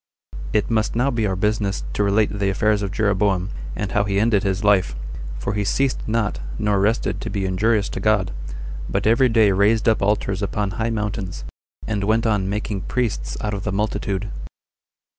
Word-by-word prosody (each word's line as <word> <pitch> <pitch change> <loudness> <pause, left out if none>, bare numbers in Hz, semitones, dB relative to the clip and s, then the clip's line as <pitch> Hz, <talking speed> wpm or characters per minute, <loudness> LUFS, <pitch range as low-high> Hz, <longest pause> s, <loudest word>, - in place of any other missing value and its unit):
It 105 +2 +1
must 110 -1 +1
be - - -2
now 125 +3 +2 0.2
our 95 - -1
business 105 0 0
to 105 - +1
relate 100 +1 +2
the 100 -1 +2
affairs 105 +1 +2
of 100 -2 -2
Jeroboam, 100 -2 +1 0.2
and 100 -2 -3
how 100 - +2
he 100 0 +1
ended 110 -2 +3
his 95 +1 -1
life; 95 -9 +3 0.4
for 100 - -2
he 105 0 0
ceased 135 +6 0
not 110 -1 0 0.2
nor 105 -2 +1
rested 105 +4 +1
to - - -4
be 100 -1 -2
injurious 100 +3 +2
to - - -4
God, 105 -4 +2 0.6
but - - -1
every 120 +4 +4
day 110 -3 +4
raised 105 +4 +3
up 110 - +3
altars 100 -1 0
upon 100 0 -1
high 110 +3 -1
mountains, 105 -4 -3 0.4
and 105 -2 -1
went 110 +3 +2
on 105 -4 +1
making 105 -1 -2
priests 95 - -2
out 105 -1 -2
of 100 -1 -4
the 100 - -2
multitude. 100 0 -2
105 Hz, 185 wpm, -22 LUFS, 100-110 Hz, 0.6 s, every